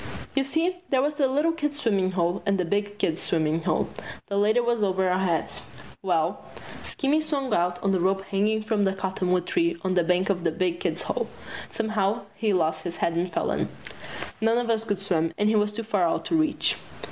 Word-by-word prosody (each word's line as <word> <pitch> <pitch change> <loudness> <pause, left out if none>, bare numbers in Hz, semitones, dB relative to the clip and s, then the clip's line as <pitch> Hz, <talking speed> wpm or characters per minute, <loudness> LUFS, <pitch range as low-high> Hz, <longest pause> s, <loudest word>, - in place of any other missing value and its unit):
You 275 - +2
see, 330 +6 0
there 265 - +3
was 295 +1 +1
the 285 -2 +2
little 295 +5 +2
kids' 295 -3 -2
swimmin' 195 -7 +1
hole 175 +1 0
and 200 0 +1
the 180 - 0
big 205 +3 -1
kids' 165 -4 0
swimmin' 160 0 +1
hole. - - +1 0.4
The 200 - -2
latter 215 +4 +3
was 235 -2 +1
over 190 -2 +2
our 180 0 +2
heads. 175 -4 -1 0.4
Well, - - 0 0.4
Skinny 295 +2 0
swung 280 -4 -2
out 175 +1 +1
on 195 - +2
the 190 - +2
rope 190 +2 +1
hanging 210 +3 0
from 215 -1 +1
the 190 0 +1
cottonwood 185 -2 0
tree 340 0 +1
on 185 - +1
the 180 -1 +3
bank 180 +3 +2
of 180 -3 -2
the 170 - +3
big 175 +1 -1
kids' 170 -1 -1
hole. - - -2 0.4
Somehow 220 0 0
he 210 +1 0
lost 160 -4 +1
his 170 +1 -5
head 170 - +1
and 175 +2 -1
fell - - 0
in. - - -1 0.7
None 225 +1 +3
of 240 -1 +1
us 225 -1 +1
could 205 -3 0
swim, 170 -4 0
and 210 +1 +3
he 220 - +3
was 210 0 +2
too 230 +2 -4
far 205 -6 +1
out - - -1
to - - 0
reach. 315 -1 +2
200 Hz, 215 wpm, -26 LUFS, 180-235 Hz, 0.7 s, there